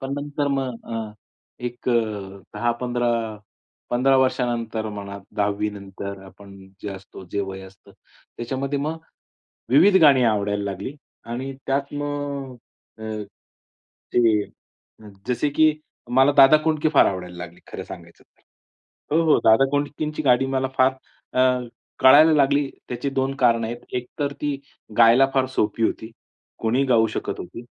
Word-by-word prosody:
पण 135 Hz, +1 st, -4 dB
नंतर 145 Hz, 0 st, -2 dB
मग 135 Hz, -4 st, -2 dB
अ, 110 Hz, -2 st, -4 dB, 0.5 s
एक 120 Hz, +1 st, -5 dB
अ, -, -, +3 dB, 0.6 s
10-15, 120 Hz, 0 st, -1 dB, 0.8 s
15 130 Hz, +2 st, +3 dB
वर्षानंतर 120 Hz, -4 st, 0 dB
म्हणा, 100 Hz, -1 st, -7 dB, 0.2 s
10वी 105 Hz, +1 st, 0 dB
नंतर 100 Hz, -1 st, -8 dB
आपण 100 Hz, +1 st, -14 dB, 0.3 s
जे 105 Hz, -, -4 dB
असतो, 95 Hz, 0 st, -12 dB
जे 100 Hz, -, 0 dB
वय 95 Hz, -1 st, -5 dB
असतं, 95 Hz, 0 st, -16 dB, 0.4 s
त्याच्यामध्ये 135 Hz, +4 st, -3 dB
मग 155 Hz, +3 st, -3 dB, 0.7 s
विविध 180 Hz, +10 st, +6 dB
गाणी 140 Hz, -5 st, +6 dB
आवडायला 105 Hz, -2 st, +1 dB
लागली 100 Hz, +7 st, -5 dB, 0.3 s
आणि 125 Hz, +4 st, -5 dB
त्यात 140 Hz, +1 st, -1 dB
मग 145 Hz, -2 st, -4 dB, 0.4 s
अ, -, -, -9 dB, 1.1 s
ते 110 Hz, -4 st, +3 dB, 0.8 s
जसे 125 Hz, +4 st, 0 dB
की 155 Hz, +2 st, +4 dB, 0.4 s
मला 135 Hz, +3 st, +5 dB
दादा 135 Hz, +2 st, +8 dB
कोंडके 155 Hz, -1 st, +1 dB
फार -, -, +6 dB
आवडायला 90 Hz, -2 st, -3 dB
लागले, 85 Hz, 0 st, -9 dB
खरं -, -, -7 dB
सांगायचं 85 Hz, -1 st, -12 dB
तर. -, -, -38 dB, 0.7 s
हो, 165 Hz, -, +4 dB
हो, 160 Hz, -2 st, +4 dB
दादा 110 Hz, +4 st, +6 dB
कोंडकेची 145 Hz, +2 st, -2 dB
गाणी 130 Hz, -1 st, +4 dB
मला 130 Hz, 0 st, +1 dB
फार 130 Hz, +1 st, +4 dB, 0.4 s
अ, -, -, +5 dB, 0.6 s
कळायला 150 Hz, +5 st, +7 dB
लागली, 140 Hz, -1 st, +3 dB, 0.2 s
त्याची 125 Hz, +3 st, -3 dB
2 135 Hz, 0 st, -1 dB
कारणं 115 Hz, -3 st, +2 dB
आहेत. 120 Hz, +1 st, -5 dB, 0.2 s
एक 125 Hz, 0 st, -2 dB
तर 140 Hz, -1 st, -1 dB
ती 145 Hz, -2 st, -2 dB, 0.4 s
गायला 120 Hz, +3 st, +7 dB
फार 135 Hz, -1 st, +2 dB
सोपी 105 Hz, +2 st, 0 dB
होती. 110 Hz, 0 st, -2 dB, 0.5 s
कोणीही 120 Hz, +5 st, +1 dB
गाऊ 115 Hz, -4 st, +4 dB
शकत 110 Hz, -, -4 dB
होती 95 Hz, +7 st, -8 dB
125 Hz, 140 wpm, -23 LUFS, 110-140 Hz, 1.1 s, दादा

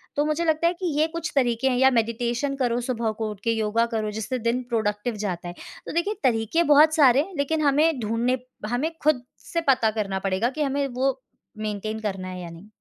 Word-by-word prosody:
तो 290 Hz, -, +2 dB
मुझे 305 Hz, +2 st, 0 dB
लगता 320 Hz, +1 st, +2 dB
है 345 Hz, -, +2 dB
कि 365 Hz, +1 st, -6 dB
ये 310 Hz, -, +5 dB
कुछ 330 Hz, -1 st, -4 dB
तरीके 245 Hz, -1 st, +2 dB
हैं, 250 Hz, -, +1 dB
या 265 Hz, +1 st, +6 dB
मेडिटेशन 240 Hz, +3 st, 0 dB
करो 245 Hz, -3 st, +1 dB
सुबह 235 Hz, -2 st, -1 dB
को 220 Hz, -1 st, -1 dB
उठ 210 Hz, -, -9 dB
के, 230 Hz, -, +2 dB
योगा 225 Hz, +1 st, +1 dB
करो 215 Hz, -2 st, -1 dB
जिससे 220 Hz, +4 st, -3 dB
दिन 235 Hz, +2 st, 0 dB
प्रोडक्टिव 220 Hz, 0 st, -1 dB
जाता 175 Hz, -2 st, -3 dB
है। 175 Hz, -, -6 dB, 0.3 s
तो -, -, -4 dB
देखिए, 340 Hz, +6 st, 0 dB
तरीके 240 Hz, +6 st, +2 dB
बहुत 310 Hz, +2 st, +6 dB
सारे 270 Hz, -5 st, +6 dB
हैं, 375 Hz, +6 st, -7 dB
लेकिन 310 Hz, +3 st, 0 dB
हमें 295 Hz, +1 st, +3 dB
ढूँढने 230 Hz, +3 st, 0 dB, 0.3 s
हमें 275 Hz, +7 st, 0 dB
खुद 290 Hz, -5 st, +2 dB, 0.3 s
से 335 Hz, -, +1 dB
पता 230 Hz, -4 st, +4 dB
करना 195 Hz, -2 st, -1 dB
पड़ेगा 195 Hz, +4 st, 0 dB
कि 305 Hz, -, +1 dB
हमें 280 Hz, 0 st, 0 dB
वो 265 Hz, +1 st, -1 dB, 0.4 s
मेंटेन 215 Hz, 0 st, -3 dB
करना 195 Hz, -4 st, -4 dB
है 185 Hz, 0 st, -6 dB
या 175 Hz, -, -7 dB
नहीं। 165 Hz, +4 st, -12 dB
245 Hz, 215 wpm, -24 LUFS, 220-285 Hz, 0.4 s, या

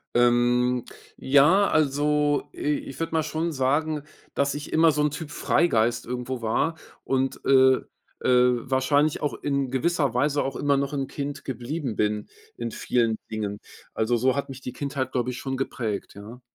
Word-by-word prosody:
Ähm, 120 Hz, 0 st, +3 dB, 0.3 s
ja, 150 Hz, +9 st, +5 dB
also, 145 Hz, 0 st, +1 dB
i -, -, -15 dB, 0.3 s
ich -, -, -9 dB
würde 165 Hz, 0 st, -3 dB
mal 160 Hz, -1 st, +2 dB
schon 160 Hz, +2 st, -2 dB
sagen, 150 Hz, +3 st, 0 dB, 0.3 s
dass 140 Hz, 0 st, +1 dB
ich 145 Hz, 0 st, -7 dB
immer 160 Hz, 0 st, +5 dB
so 150 Hz, 0 st, 0 dB
'n 150 Hz, -, +2 dB
Typ 150 Hz, 0 st, -7 dB
Freigeist 120 Hz, -8 st, +1 dB
irgendwo 125 Hz, +1 st, -4 dB
war 145 Hz, +9 st, 0 dB, 0.3 s
und, 135 Hz, 0 st, -1 dB
äh, 130 Hz, -1 st, +5 dB, 0.4 s
äh, 125 Hz, -1 st, +3 dB
wahrscheinlich 145 Hz, +3 st, +2 dB
auch 145 Hz, -6 st, -1 dB
in 140 Hz, -2 st, -1 dB
gewisser 145 Hz, -1 st, +1 dB
Weise 145 Hz, +3 st, +1 dB
auch 135 Hz, -, -3 dB
immer 140 Hz, -1 st, +2 dB
noch 140 Hz, +1 st, -2 dB
'n 135 Hz, -1 st, -1 dB
Kind 140 Hz, 0 st, -5 dB
geblieben 130 Hz, 0 st, -4 dB
bin 105 Hz, 0 st, -1 dB, 0.3 s
in 120 Hz, -1 st, -4 dB
vielen 115 Hz, -2 st, 0 dB
Dingen. 105 Hz, -2 st, -4 dB, 0.3 s
Also, 115 Hz, +2 st, +1 dB
so 130 Hz, +2 st, +2 dB
hat 140 Hz, -, -2 dB
mich 135 Hz, 0 st, -9 dB
die 125 Hz, -, -5 dB
Kindheit, 135 Hz, -2 st, -3 dB
glaube 125 Hz, 0 st, 0 dB
ich, 125 Hz, -, -5 dB
schon 135 Hz, +1 st, -3 dB
geprägt, 110 Hz, -6 st, -3 dB
ja. 110 Hz, +5 st, -11 dB
135 Hz, 170 wpm, -25 LUFS, 120-145 Hz, 0.4 s, ja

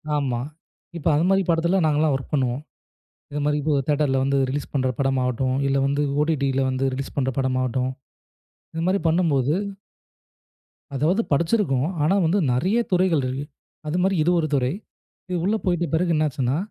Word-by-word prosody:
ஆமா. 130 Hz, -5 st, -1 dB, 0.6 s
இப்ப 160 Hz, -, -4 dB
அது 155 Hz, -, +2 dB
மாரிப் 195 Hz, -2 st, +2 dB
படத்துல 170 Hz, +3 st, +2 dB
நாங்க 150 Hz, -1 st, +2 dB
எல்லாம் 155 Hz, -2 st, +2 dB
வொர்க் 135 Hz, -, -6 dB
பண்ணுவோம். 130 Hz, -1 st, 0 dB, 0.7 s
இது 145 Hz, 0 st, -3 dB
மாரி 150 Hz, 0 st, +1 dB, 0.2 s
ஒரு 140 Hz, -, +1 dB
தேட்டர்ல 145 Hz, -3 st, +2 dB
வந்து 140 Hz, 0 st, +1 dB
ரிலீஸ் 140 Hz, +2 st, -4 dB
பண்ற 130 Hz, -1 st, +1 dB
படம் 135 Hz, -1 st, +1 dB
ஆகட்டும், 130 Hz, +1 st, 0 dB
இல்ல 135 Hz, 0 st, +1 dB
வந்து 140 Hz, +1 st, 0 dB, 0.2 s
OTTல 140 Hz, -4 st, 0 dB
வந்து 130 Hz, +1 st, -1 dB
ரிலீஸ் 135 Hz, +1 st, -5 dB
பண்ற 130 Hz, -2 st, +1 dB
படம் 130 Hz, -1 st, 0 dB
ஆகட்டும். 130 Hz, +1 st, -1 dB, 0.8 s
இது 165 Hz, -, -2 dB
மாரி 195 Hz, +1 st, +1 dB
பண்ணும்போது 155 Hz, -5 st, +2 dB, 1.4 s
அதாவது 165 Hz, -, +2 dB
படிச்சிருக்கோம், 160 Hz, -, +1 dB
ஆனா 180 Hz, +6 st, +3 dB
வந்து 175 Hz, +6 st, +2 dB
நறைய 180 Hz, -, +1 dB
துறைகள் 180 Hz, -5 st, +2 dB
இருக்கு. 135 Hz, +3 st, -4 dB, 0.4 s
அது 155 Hz, -, -1 dB
மாரி 190 Hz, 0 st, +2 dB
இது 175 Hz, -, +2 dB
ஒரு 155 Hz, -, 0 dB
துறை. 130 Hz, +1 st, +1 dB, 0.7 s
உள்ள 205 Hz, +4 st, +1 dB
போயிட்ட 175 Hz, -1 st, +1 dB
பிறகு 170 Hz, +1 st, +1 dB
என்ன 155 Hz, -, +2 dB
ஆச்சுன்னா 130 Hz, 0 st, -1 dB
145 Hz, 165 wpm, -23 LUFS, 135-170 Hz, 1.4 s, ஆனா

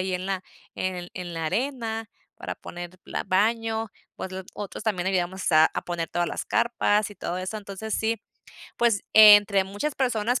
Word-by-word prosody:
ahí 185 Hz, 0 st, -1 dB
en 180 Hz, +1 st, -3 dB
la 190 Hz, -1 st, -2 dB, 0.3 s
en 180 Hz, -1 st, -3 dB
en 175 Hz, -1 st, -6 dB
la 165 Hz, -1 st, -3 dB
arena 225 Hz, -, -2 dB, 0.2 s
para -, -, -6 dB
poner 175 Hz, +1 st, -9 dB
la -, -, -4 dB
baño, 225 Hz, +3 st, +1 dB, 0.3 s
otl 190 Hz, 0 st, -5 dB
otros 205 Hz, -2 st, -6 dB
también 190 Hz, -4 st, 0 dB
ayudamos 185 Hz, 0 st, 0 dB
a 155 Hz, 0 st, +7 dB
a -, -, -3 dB
poner 170 Hz, -2 st, -3 dB
todas 175 Hz, -1 st, -1 dB
las -, -, -4 dB
carpas 215 Hz, -3 st, +1 dB
y -, -, -10 dB
todo 180 Hz, -2 st, -4 dB
eso. 185 Hz, +4 st, -4 dB
Entonces 205 Hz, +1 st, -5 dB
sí, 225 Hz, -1 st, 0 dB, 0.6 s
pues, 230 Hz, -4 st, +2 dB
entre 205 Hz, -2 st, +8 dB
muchas 205 Hz, +10 st, -3 dB
personas, 245 Hz, -2 st, 0 dB
200 Hz, 175 wpm, -26 LUFS, 185-220 Hz, 0.6 s, entre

